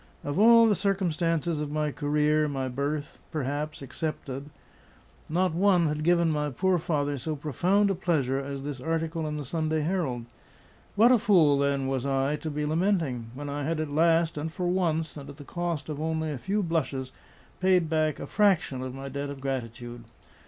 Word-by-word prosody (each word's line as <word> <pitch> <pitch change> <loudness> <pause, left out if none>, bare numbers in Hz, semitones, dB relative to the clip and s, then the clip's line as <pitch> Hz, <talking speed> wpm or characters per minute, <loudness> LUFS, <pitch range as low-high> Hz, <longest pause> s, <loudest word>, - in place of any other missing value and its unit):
Of 145 +5 -2
all 230 +1 +8
the 215 - +4
circumstances 170 -5 0
of 150 - -3
my 150 0 -1
career, 150 +1 +1
my 135 -2 -2
birth, 145 +3 -3
perhaps, 145 0 -3
excepted, 140 -1 -5 0.8
not 180 +1 +1
one 180 -1 +4
had 150 0 -1
given 170 0 +3
my 150 -1 0
poor 180 +6 +1
father 145 -4 -1
so 155 +4 -3
profound 180 - +1
a - - +2
pleasure 150 -8 0
as 140 0 -5
this 140 -3 -5
article 165 +1 -2
in 150 0 -3
the 145 - -5
Sunday 155 +2 -1
Herald. 150 -8 -1 0.7
What 225 +4 +6
a 250 - +5
fool, 165 -10 +4
then, 140 -1 +1
was 135 -2 -1
I, 135 +1 +1
to 160 - -5
be 150 0 -2
lamenting! 155 - 0
when 145 +2 -6
I 145 +1 -3
had 160 +2 -1
at 155 -2 -3
last, 165 +1 +3
and 160 +2 -3
for 180 +2 -3
once, 165 -4 0
and 140 -1 -9
at 140 - -10
the 145 - -9
cost 170 -1 -3
of 150 -1 -5
only 160 -1 -1
a 140 - -4
few 200 - -1
blushes, 140 -6 -2 0.5
paid 185 -2 +3
back 155 -1 0
a - - -5
fraction 190 -11 +2
of 130 0 -5
my 135 0 -6
debt 140 +1 -4
of 140 -1 -7
gratitude. 120 -3 -5
155 Hz, 190 wpm, -27 LUFS, 140-170 Hz, 0.8 s, all